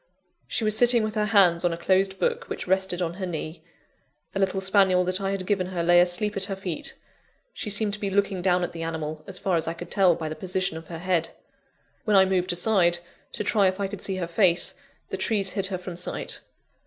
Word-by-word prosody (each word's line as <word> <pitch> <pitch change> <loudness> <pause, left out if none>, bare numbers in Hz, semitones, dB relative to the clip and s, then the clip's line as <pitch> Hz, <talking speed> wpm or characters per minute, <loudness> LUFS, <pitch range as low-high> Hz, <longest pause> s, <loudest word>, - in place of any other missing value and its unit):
She - - -1
was 215 0 +2
sitting 240 -1 +5
with 215 0 -2
her 210 -1 0
hands 185 -5 +4
on 175 - +2
a 165 - -3
closed 190 +2 +1
book - - -1
which - - -5
rested 190 -1 +1
on 170 -1 -2
her - - -1
knee. 160 -1 -6 0.7
A 195 - -2
little 195 0 +1
spaniel 190 -1 +3
that 185 +2 -1
I 195 - -1
had 195 -1 -3
given 185 -2 0
her 180 -2 -3
lay 175 +1 +6
asleep 180 +4 0
at 195 -1 0
her 195 -1 -4
feet: 185 -5 -4 0.6
she - - -5
seemed 210 0 +1
to 210 - -4
be 200 - -2
looking 195 -1 0
down 180 -1 +2
at - - -2
the 165 - -6
animal, 160 -1 -4
as 190 -2 0
far 185 -2 0
as 165 - -2
I 165 - -2
could 175 +1 -9
tell 190 -4 +4
by 160 - -5
the 155 - -5
position 185 -1 -2
of 160 0 -9
her 165 - -7
head. 175 -1 0 0.7
When 210 -3 +3
I 190 - +7
moved 185 -1 0
aside, 175 -1 +2 0.4
to - - -3
try 205 -2 +3
if 185 +1 -1
I 200 - 0
could 200 0 -8
see 190 - 0
her 185 -2 -2
face, 175 0 +2 0.4
the - - -3
trees 200 -4 0
hid 195 -1 -1
her 190 -1 -3
from 180 -1 -8
sight. 180 - -3
185 Hz, 240 wpm, -25 LUFS, 175-195 Hz, 0.7 s, I